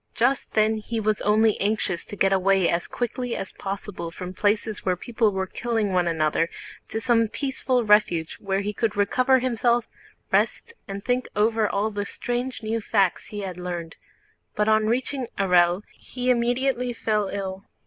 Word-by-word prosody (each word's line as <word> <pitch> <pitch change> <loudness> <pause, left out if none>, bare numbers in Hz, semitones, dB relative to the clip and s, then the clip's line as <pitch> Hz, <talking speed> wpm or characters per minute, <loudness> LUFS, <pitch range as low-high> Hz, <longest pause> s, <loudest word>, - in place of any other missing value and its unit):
Just 255 +3 +1
then 220 0 +3
he 225 +1 -3
was 215 -1 0
only 215 +1 +3
anxious 200 -4 0
to - - -8
get 195 -1 +3
away 190 -1 +3
as 170 +1 0
quickly 245 0 -3
as 195 - -5
possible 195 -3 -5
from 180 +2 -7
places 210 +2 0
where 185 -1 +1
people 225 +3 0
were 190 -1 -1
killing 225 -1 -1
one 180 -1 +2
another, 165 0 +1 0.4
to 220 - -2
some 230 -2 +3
peaceful 260 0 -1
refuge 210 -6 +3
where 195 -1 -1
he 205 +1 -3
could 220 -1 -1
recover 255 +6 +3
himself, 240 -1 +1 0.4
rest, 465 - +1
and 200 0 -6
think 250 0 0
over 215 0 +2
all 205 +2 0
the 205 -1 -3
strange 245 +3 -3
new 220 +1 -1
facts 200 -4 +1
he 205 -1 -6
had 185 -3 -5
learned; 175 -2 -5 0.6
but 210 0 +1
on 215 0 +3
reaching 255 +2 -1
Orël 180 -1 +3
he 250 0 -2
immediately 245 +1 +1
fell 215 -3 0
ill. 195 -1 -5
215 Hz, 170 wpm, -25 LUFS, 195-235 Hz, 0.6 s, then